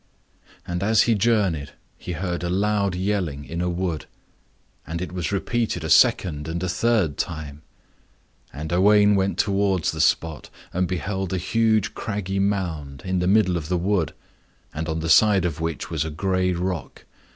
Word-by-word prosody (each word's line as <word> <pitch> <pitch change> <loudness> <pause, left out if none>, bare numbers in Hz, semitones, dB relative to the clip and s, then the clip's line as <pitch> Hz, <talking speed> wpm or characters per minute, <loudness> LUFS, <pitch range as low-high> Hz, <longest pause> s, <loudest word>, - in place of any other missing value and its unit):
And 90 0 -3
as 110 +2 +4
he 115 - +2
journeyed 100 -9 +1 0.2
he 90 - -6
heard 85 +1 -3
a 85 - -1
loud 100 0 +1
yelling 90 -7 -2
in 85 +1 -4
a 90 - 0
wood. 85 -3 -3 0.8
And 85 +1 -4
it 90 - -5
was 90 -2 -3
repeated 105 -3 -1
a 80 - -2
second 80 -1 +4
and 85 +2 -3
a - - 0
third 95 -6 +1
time. 75 -2 -4 0.9
And 80 +3 -5
Owain 105 +3 +5
went 95 0 +1
towards 100 -4 +1
the - - -2
spot, 80 -4 0 0.2
and 90 0 +1
beheld 95 +1 -3
a - - +1
huge 110 +3 +1
craggy 100 -3 -3
mound, 85 -9 -2
in 95 0 0
the 90 - 0
middle 95 -3 +3
of 80 -1 -6
the 90 - +1
wood, 90 -1 0 0.6
on 80 +1 -3
the 80 - -3
side 100 +2 +5
of 80 -2 -3
which 80 0 -3
was 80 -2 0
a 80 - -4
gray 95 +3 0
rock. 90 -3 -4
90 Hz, 170 wpm, -23 LUFS, 80-100 Hz, 0.9 s, Owain